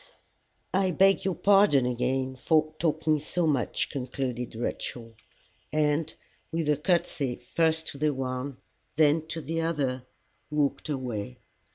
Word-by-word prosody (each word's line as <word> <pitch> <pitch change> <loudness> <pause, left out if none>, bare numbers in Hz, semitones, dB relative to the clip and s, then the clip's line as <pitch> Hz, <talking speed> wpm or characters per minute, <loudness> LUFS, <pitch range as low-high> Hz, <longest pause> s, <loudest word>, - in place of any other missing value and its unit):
"I 190 0 +3
beg 195 +2 +4
your 190 -2 +1
pardon 195 -10 +5
again 130 +2 -1
for 155 +3 +2
talking 155 -1 +1
so 170 +4 -1
much," 140 -6 0
concluded 125 -3 -3
Rachel, 115 0 -4 0.6
and, 150 +1 +1 0.4
with 165 -2 -1
a 145 - +2
courtesy 150 -5 0
first 160 +6 0
to 140 - -8
the 150 0 +2
one 130 0 -4 0.4
then 155 +1 +3
to 160 0 -4
the 165 +2 -2
other, 135 -6 -1 0.4
walked 150 0 0
away. 120 - -3
150 Hz, 130 wpm, -28 LUFS, 130-160 Hz, 0.6 s, pardon